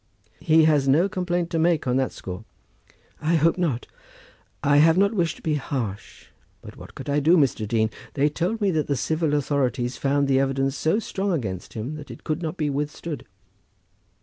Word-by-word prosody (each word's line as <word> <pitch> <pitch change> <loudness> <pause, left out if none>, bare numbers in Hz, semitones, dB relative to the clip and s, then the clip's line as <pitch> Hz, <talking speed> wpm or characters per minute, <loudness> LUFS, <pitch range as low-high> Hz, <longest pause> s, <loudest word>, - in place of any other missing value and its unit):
"He 160 -1 +4
has 150 -3 +3
no 155 +8 +4
complaint 175 -2 -2
to 165 - 0
make 165 -1 +2
on 125 -1 +1
that 135 -1 0
score." 90 +2 -7 0.8
"I 160 +2 +2
hope 165 +1 +3
not. 145 -9 -1 0.8
I 145 0 +4
have 160 +3 +5
not 200 +3 +3
wished 175 -6 0
to - - -16
be 155 - 0
harsh, 125 -8 -4 0.3
but - - -11
what - - -12
could - - -8
I 145 +1 +2
do, 165 +5 +4
Mr. 130 -7 +1
Dean? 110 0 +1 0.2
They 145 0 +3
told 175 +9 -2
me 200 -2 +2
that 155 -3 0
the 140 - +1
civil 155 +1 0
authorities 130 -4 0
found 140 0 +1
the 135 -1 +3
evidence 135 0 0
so 160 +6 +1
strong 200 -3 -2
against 100 - -3
him 115 +7 -4
that 150 - -10
it - - -10
could 155 +2 -2
not 165 +1 -4
be 150 - 0
withstood." 145 +2 -4
150 Hz, 195 wpm, -24 LUFS, 135-165 Hz, 0.8 s, have